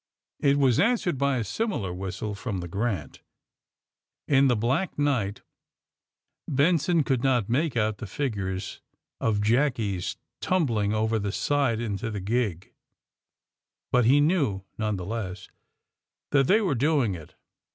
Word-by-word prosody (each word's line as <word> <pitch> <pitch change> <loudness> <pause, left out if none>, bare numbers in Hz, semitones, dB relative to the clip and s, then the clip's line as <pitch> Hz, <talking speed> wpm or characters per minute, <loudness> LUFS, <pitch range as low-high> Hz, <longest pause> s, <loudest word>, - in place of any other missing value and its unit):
It 140 0 +3
was 130 -4 +3
answered 200 - +2
by 140 -1 +2
a 120 - 0
simi 220 - -2
lar 95 -3 -3
whistle 95 +3 -4
from 105 0 -4
the 85 - -5
*^ - - -15
Grant." 100 - -3 1.1
In 140 -1 +5
the 125 - +3
black 125 - 0
night 130 -9 0 1.0
Benson 160 +3 +2
could 130 -3 0
not 125 -6 +2
make 140 +2 +1
out 110 -2 0
the 110 - -6
figures 95 -6 -3 0.4
of 105 -2 +1
jackies 110 -5 0 0.2
tumbling 115 - +1
over 110 +1 +1
the 100 -1 -2
side 135 -1 +1
into 115 0 -3
the 105 -2 -4
gig, 100 -3 -2 1.2
but 125 -2 +4
he 135 +5 +5
knew, 145 - +1
none 110 -2 -1
the 90 -2 -5
less, 100 -3 -5 0.8
that 135 -2 +4
they 215 +3 +4
were 190 -8 +1
doing 135 -4 +2
it. 80 -4 -10
115 Hz, 145 wpm, -26 LUFS, 100-140 Hz, 1.2 s, In